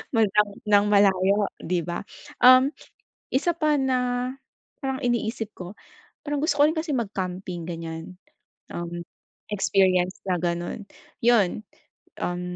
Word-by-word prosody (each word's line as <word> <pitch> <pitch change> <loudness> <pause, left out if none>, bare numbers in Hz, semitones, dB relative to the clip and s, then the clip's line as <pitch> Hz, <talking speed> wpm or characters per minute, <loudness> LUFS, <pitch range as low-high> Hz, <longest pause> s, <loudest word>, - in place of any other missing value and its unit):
ng 225 -1 +4 0.4
ng 205 -1 +4
malayo, 200 0 +4 0.2
'di 175 -2 -1
ba? 175 - -3 0.4
Um, 255 +3 +7 0.6
isa 315 +6 +1
pa 305 -3 +2
na 250 -1 0 0.5
parang 265 0 -2
iniisip 230 -3 -1
ko, 180 +1 -8 0.5
parang 295 -1 -3
gusto 310 -2 0
ko 295 - +7
rin 320 - -3
kasi 315 0 -2
mag-camping, 185 -6 -3
ganyan. 165 +1 -7 0.5
Um, 175 0 -5 0.5
experience 190 -2 +2
na 185 - +2
ganun. 175 +4 -2 0.4
Yun, 220 -4 +3 0.6
um, 175 0 -2
205 Hz, 120 wpm, -25 LUFS, 180-255 Hz, 0.6 s, Um